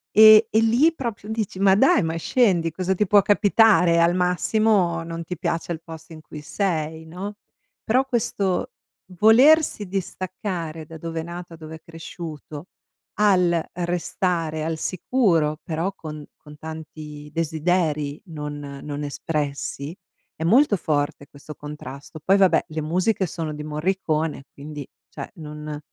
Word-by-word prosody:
E 215 +1 +9
e 220 - +3
lì 245 +9 +4
proprio 230 -7 -5
dici: 220 -4 -3
"Ma 195 -1 +5
dai, 265 +7 +5
ma 160 0 -2
scendi, 175 -2 +2
cosa 185 +3 -1
ti 210 - +1
può 205 +1 +5
capitare? 200 -4 +4
Al 170 +1 +3
massimo, 180 -1 +2
non 165 0 -6
ti 180 +2 -6
piace 170 0 -2
il 165 -1 -4
posto 160 0 -11
in 155 - -11
cui 150 -1 -10
sei, 160 -2 -2
no?" 185 +6 -7 0.5
Però 255 +4 +2
questo 215 - -1 0.5
volersi 250 +1 +5
distaccare 180 -3 -4
da 160 +1 -10
dove 165 0 -4
è - - -7
nata, 170 0 -8
dove 160 0 -9
è 160 - -13
cresciuto 165 -1 -9 0.5
al 180 -5 +3
restare 175 -2 -2
al 160 0 -2
sicuro 165 - +1
però 165 +4 -2
con 155 -3 -8
con 150 0 -15
tanti 150 -1 -9
desideri 155 -2 0
non 150 -3 -6 0.2
non 145 0 -5
espressi, 145 +1 -4 0.4
è 160 - -5
molto 220 - +4
forte, 145 -3 -2
questo 145 +2 -12
contrasto. 145 0 -9
Poi 195 +4 +4
vabbè, 190 -2 +4
le 155 0 -3
musiche 185 +6 0
sono 160 -3 -4
di 150 0 -6
Morricone, 155 -2 -2
quindi 145 -1 -8 0.2
cioè - - -8
non 150 -2 -7
165 Hz, 145 wpm, -23 LUFS, 155-195 Hz, 0.5 s, E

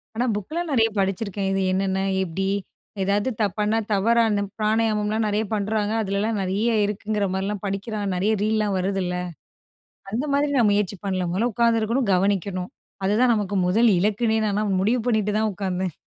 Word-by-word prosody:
ஆனா 240 +3 0
புக்லாம் 315 - -4
நிறையா 225 -4 +3
படிச்சிருக்கேன். 195 0 -1
இது 195 0 0
என்னென்ன? 190 0 0 0.2
எப்டி? 190 +2 -3 0.5
ஏதாவது 200 +4 +1
தப்பான, 210 +2 +1
தவறான 220 +1 +3 0.2
பிராணயமம்லாம் 215 0 +1
நேறையா 210 +1 0
பண்ணுறாங்க. 210 0 0
அதிலல்லாம் 205 +2 -1
நிறைய 200 +5 0
இருக்குங்கிற 210 0 -2
மாரில்லாம் 195 +1 -3
படிக்கிறோம், 200 0 -3
நிறைய 195 +4 +1
ரீல்லாம் 215 -1 +1
வருதுல்ல! 185 -1 -1 1.0
அந்த 235 +8 -1
மாதிரி 285 +1 +2
நான் 230 -4 +4
முயற்சி 200 -1 0
பண்ணல, 185 -2 -1
மொதல்ல 220 +7 0
உக்காந்துருக்கணும், 230 +2 +1
கவனிக்கணும். 185 -1 0 0.3
அதுதான், 225 +5 +3
நமக்கு 205 -2 -1
முதல் 225 +6 +4
இலக்குனே 215 +4 +1
நால்லாம் 205 -1 0
முடிவு 230 +6 +2
பண்ணிட்டு 215 -3 +1
தான் 220 0 +1
உக்காந்தேன். 185 -3 -3
210 Hz, 140 wpm, -23 LUFS, 195-220 Hz, 1.0 s, நான்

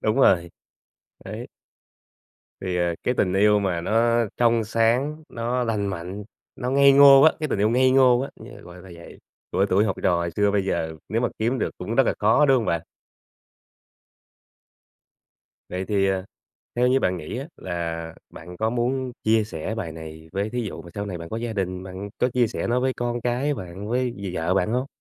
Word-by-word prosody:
Đúng 110 0 0
rồi. 90 -10 +4 0.7
Đấy. - - -7 1.1
Thì, 90 -1 -2
ờ, 85 -1 0
cái 125 - +1
tình 90 -2 +1
yêu 105 +1 +4
mà 90 -4 -1
nó 115 +5 +2
trong 115 -1 +3
sáng, 120 +8 0
nó 120 +2 -2
lành 105 -4 -1
mạnh, 95 +2 -5 0.3
nó 125 - -3
ngây 140 0 +6
ngô 140 0 +8
á, 160 - +7
cái 155 -2 -2
tình 100 - -1
yêu 105 - +3
ngây 130 +2 +3
ngô 130 -2 +5
á 140 - -4
như, - - -12
gọi 85 - -12
là, 95 - -14
vậy, 85 - -13 0.3
của 100 - +2
tuổi 100 +4 +3
học 95 - -1
trò 90 - +3
hồi 85 0 -1
xưa, 105 0 +2
bây 100 -2 0
giờ 80 -4 -2
nếu 115 +3 0
mà 120 - +2
kiếm 120 +3 0
được - - 0
cũng 115 - -4
rất 135 - +4
là - - +1
khó, 110 +8 +4
đúng 135 - +5
hông 115 - -1
bạn? 85 -4 0 2.9
Vậy 90 +1 -4
thì, 100 -1 +1
ờ, 95 -1 -1 0.5
theo 125 +1 +3
như 130 +1 +3
bạn 90 - 0
nghĩ 80 +7 -6
á 135 - -5
là 85 -2 -5 0.2
bạn 90 +2 -10
có 110 +4 0
muốn 125 +1 -1
chia 110 0 +3
sẻ 105 +1 -5
bài 90 -8 -5
này 80 0 -10
với 100 +2 -2
thí 125 +1 -2
dụ 105 -5 -6
mà 85 - -12
sau 100 0 -4
này 90 -3 -5
bạn 85 0 -8
có 110 - -4
gia 115 0 -3
đình, 95 -3 -3
bạn 95 +2 -7
có 125 - +2
chia 125 -1 +2
sẻ - - -4
nó 120 +1 +1
với 130 +1 +1
con 120 0 -2
cái 125 +5 0
bạn, 95 -1 -7
với 125 +1 -1
d 95 -2 -6
vợ 85 +3 0
bạn 95 +3 +1
hông? 130 +2 0
105 Hz, 210 wpm, -24 LUFS, 90-125 Hz, 2.9 s, ngô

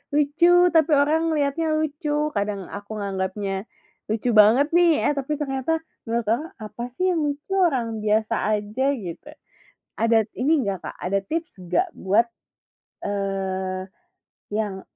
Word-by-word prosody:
lucu 345 +5 +4
tapi 320 -1 +3
orang 295 +3 +3
ngeliatnya 295 +2 0
lucu, 300 0 -1
kadang 200 -1 -1
aku 200 +1 -8
nganggapnya, 195 0 -3 0.4
lucu 220 +3 0
banget 220 +6 +6
nih, 345 -1 +6 0.2
eh, - - +2
tapi 275 +2 -2
ternyata 270 +1 -1 0.4
menurut 230 -1 -1
orang 235 +8 +1 0.2
apa 215 +2 -7
sih 370 +8 +1
yang 340 - 0
lucu? 290 +6 -4
Orang 255 -11 +1
biasa 220 +2 +2 0.2
aja 210 +6 -2
gitu. 185 -11 -7 0.7
Ada 225 -1 +3
ini 285 +5 +2
nggak, 195 -2 -1
Kak, - - -7
ada 195 +2 0
tips 330 - -4
nggak 175 0 +1
buat 205 +5 +2 0.8
eee, 190 -2 -2 0.7
yang 205 -3 -2
230 Hz, 135 wpm, -24 LUFS, 200-295 Hz, 0.8 s, banget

